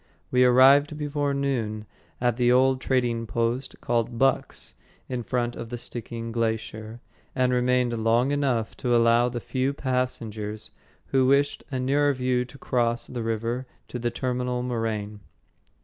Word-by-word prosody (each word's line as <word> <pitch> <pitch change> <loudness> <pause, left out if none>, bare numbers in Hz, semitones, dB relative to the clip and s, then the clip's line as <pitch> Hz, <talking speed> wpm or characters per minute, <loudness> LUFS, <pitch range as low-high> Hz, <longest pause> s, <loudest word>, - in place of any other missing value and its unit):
We 125 0 +4
arrived 135 +4 +6
before 145 -1 -1
noon 115 -6 -2 0.3
at 120 -2 +1
the 120 -1 +3
old 130 +1 +4
trading 120 -4 0
post 115 +5 -2
called 120 0 -1
"Buck's" 135 +2 0 0.3
in 125 -1 -3
front 120 +1 -2
of 115 - -7
the 120 - -4
Stickeen 115 -1 -6
Glacier, 110 0 -3 0.3
and 125 -1 +2
remained 125 -1 +2
long 120 +4 +3
enough 135 -6 0
to 120 -1 +1
allow 115 +1 +4
the 120 0 -4
few 130 +3 -1
passengers 115 -6 -3 0.4
who 130 -1 +3
wished 140 +1 +2
a 130 -2 -3
nearer 145 +3 +2
view 125 -1 0
to 135 - -14
cross 120 -3 0
the 120 - -5
river 115 +3 -2 0.2
to 125 - -5
the 120 0 0
terminal 125 0 -2
moraine. 110 -4 -3
125 Hz, 150 wpm, -25 LUFS, 115-130 Hz, 0.4 s, arrived